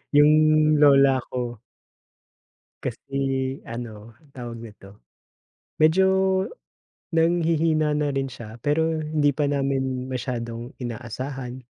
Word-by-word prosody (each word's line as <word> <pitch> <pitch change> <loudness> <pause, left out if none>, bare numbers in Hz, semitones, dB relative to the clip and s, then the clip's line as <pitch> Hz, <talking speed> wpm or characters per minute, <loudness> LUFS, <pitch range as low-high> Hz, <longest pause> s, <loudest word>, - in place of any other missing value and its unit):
yung 145 +1 +7 0.5
lola 140 -2 +6
ko. 120 -3 -4 1.2
Kasi 135 -1 -3
ano, 115 -2 -8 0.2
tawag 120 -2 -7
nito. 105 -3 -13 0.8
Medyo 160 +5 +5 1.1
nanghihina 165 -2 +2
na 150 0 0
rin 135 -1 -1
siya 115 -3 -10
pero 160 +4 0
hindi 150 -1 +2
pa 150 - +1
namin 135 -2 -1
masyadong 120 -1 -4
inaasahan. 125 +1 -6
135 Hz, 90 wpm, -24 LUFS, 120-150 Hz, 1.2 s, yung